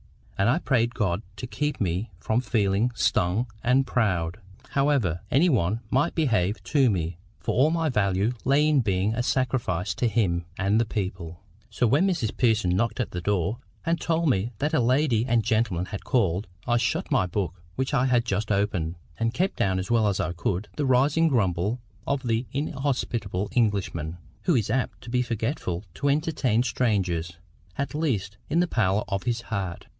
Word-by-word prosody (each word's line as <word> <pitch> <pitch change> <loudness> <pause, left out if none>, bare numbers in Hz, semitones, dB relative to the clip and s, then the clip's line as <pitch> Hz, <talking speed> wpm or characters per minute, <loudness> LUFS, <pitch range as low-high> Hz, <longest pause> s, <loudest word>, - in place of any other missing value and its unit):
And 100 +2 +2
I 130 - +3
prayed 120 -7 +1
God 95 -4 0
to 125 - -6
keep 150 +4 -2
me 95 +3 -1
from 110 +6 0
feeling 110 -2 +1
STUNG 95 +3 +1 0.2
and 130 +2 +3
proud, 90 -9 0 0.3
however 135 - +1
any 150 +8 +4
one 110 - +1
might 145 +6 +2
behave 110 - +1
to 135 -5 +3
me; 85 -3 -2 0.2
for - - -2
all 135 +6 +4
my 165 -1 0
value 100 -2 +1
lay 140 +3 +3
in 150 -2 +4
being 100 -1 +1
a 120 - 0
sacrifice 115 -9 0
to 120 - 0
Him 95 -7 +1
and 100 +4 +2
the - - +1
people. 95 -5 -4 0.3
So 115 +3 0
when 145 - +3
Mrs 160 - -1
Pearson 110 -7 +2
knocked 115 +6 0
at 125 - -1
the 90 - -4
door, 100 +4 0 0.3
and 170 0 0
told 165 -1 +1
me 105 0 +1
that 150 +6 -1
a - - +4
lady 125 -1 +2
and 120 -3 +2
gentleman 110 -6 +1
had 100 +1 -7
called, 100 -6 +1 0.2
I 120 0 +2
shut - - -1
my 90 - +3
book 90 -1 -3
which 130 +2 -2
I 130 -2 +3
had 120 -2 +2
just 105 0 -1
opened, 95 -5 0 0.2
and 115 +1 0
kept 190 +2 0
down 95 -1 +1
as 95 +4 -3
well 115 -2 +4
as 100 -2 0
I 85 - -1
could 90 +3 -2
the 145 -2 -1
rising 140 +6 +4
grumble 105 - +1 0.3
of 140 -1 0
the 115 0 0
inhospitable 125 -8 -2
Englishman, 95 -8 0 0.3
who 175 - +3
is 110 -4 +1
apt 130 +1 -1
to 115 - -9
be 125 0 +2
forgetful 115 - -2
to 140 - -1
entertain 140 -6 +1
strangers, 90 -10 0 0.4
at 140 +2 -2
least 105 -11 -1
in 165 - +2
the 175 - +4
parlour 105 - +1
of 100 -1 -1
his 120 -1 -1
heart. 95 -6 -4
115 Hz, 185 wpm, -26 LUFS, 95-130 Hz, 0.4 s, any